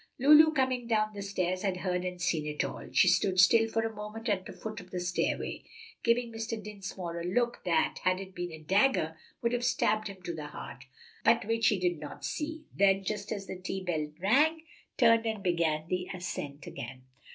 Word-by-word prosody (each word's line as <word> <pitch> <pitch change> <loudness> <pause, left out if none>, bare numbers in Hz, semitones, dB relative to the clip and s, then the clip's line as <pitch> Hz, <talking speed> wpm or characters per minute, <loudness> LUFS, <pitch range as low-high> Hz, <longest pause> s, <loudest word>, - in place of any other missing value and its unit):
Lulu, 300 +4 +7
coming 260 -4 0
down 215 -2 +1
the 200 - -6
stairs, 185 -2 -1
had 195 -3 -1
heard 180 -1 -1
and 180 -1 -4
seen 160 -4 0
it 150 0 -1
all. - - -6
She - - +5
stood 185 -2 +3
still 225 +5 +6
for 225 0 0
a 225 -1 -4
moment 215 +2 -5
at 190 -3 0
the - - -7
foot 215 +3 -7
of 180 - -15
the 180 - -4
stairway, 180 0 -1 0.4
giving 235 0 +2
Mr. 225 0 -4
Dinsmore 190 -4 -6
a - - -5
look 240 +7 0
that, 315 0 +1
had 185 0 +2
it 190 -1 -8
been 175 -1 -4
a 160 - -8
dagger, 160 - +2 0.3
would 235 +1 +1
have 245 0 0
stabbed 215 -3 +1
him 195 -2 -9
to 170 - -4
the 155 -2 -6
heart, 130 -3 -9 0.4
but 230 -1 +4
which 225 0 +2
he 205 - +3
did 175 -3 0
not 150 -1 -8
see; 315 +1 -4
then, 195 0 +4
just 210 +1 -4
as 200 -3 -3
the 185 - -7
tea 190 +1 -4
bell 155 -4 -1
rang, 295 - +3 0.3
turned 230 -1 +5
and 220 -3 -3
began 165 -4 +1
the 180 0 -2
ascent 150 -6 -5
again. 130 +2 -8
195 Hz, 210 wpm, -30 LUFS, 180-225 Hz, 0.4 s, Lulu